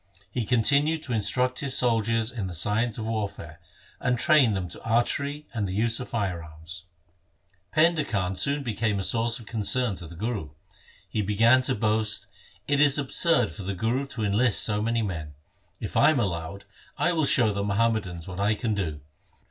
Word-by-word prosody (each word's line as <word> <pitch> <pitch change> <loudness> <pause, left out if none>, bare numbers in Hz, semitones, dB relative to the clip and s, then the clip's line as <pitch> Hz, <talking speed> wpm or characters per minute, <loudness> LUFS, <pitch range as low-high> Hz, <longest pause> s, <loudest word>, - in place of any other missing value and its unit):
He 120 -1 -2
continued 140 +6 +2
to 125 - -4
instruct 125 +4 +1
his 140 -1 0
soldiers 115 -1 +2
in 110 -6 -4
the 90 - -5
science 105 +6 +1
of 110 - -4
warfare, 100 -7 -4 0.4
and 125 -1 0
train 135 - +4
them 95 -2 -3
to - - -9
archery 140 +6 0
and 105 -4 -1
the 95 - -4
use 115 +2 +1
of 125 - -6
fire 95 -7 -2
arms. 80 +3 -10 0.9
Painda 160 0 +3
Khan 95 -3 -1
soon 140 +10 0
became 110 -3 -1
a 95 - -2
source 115 +2 +1
of 115 - -11
concern 115 +1 0
to 85 - -9
the 85 - -11
Guru. 95 - -4 0.5
He 110 - -2
began 115 +5 +4
to 130 0 +1
boast, 110 0 0 0.2
' - - -28
It 145 0 +2
is 145 -1 +5
absurd 165 +4 +2
for 105 - -9
the 95 +1 -4
Guru 120 +8 -1
to 120 -5 -5
enlist 105 +3 +2
so 105 -1 0
many 115 +1 0
men. 80 -7 -5 0.4
If - - -6
I - - +6
am 155 -4 +2
allowed, 95 -1 -3 0.3
I - - +2
will 160 -3 +1
show 115 -6 +3
the 100 - -2
Muhammadans 100 -5 -1
what 90 0 -7
I 105 +2 +2
can 110 0 -2
do. 80 -8 -3
110 Hz, 190 wpm, -26 LUFS, 100-125 Hz, 0.9 s, I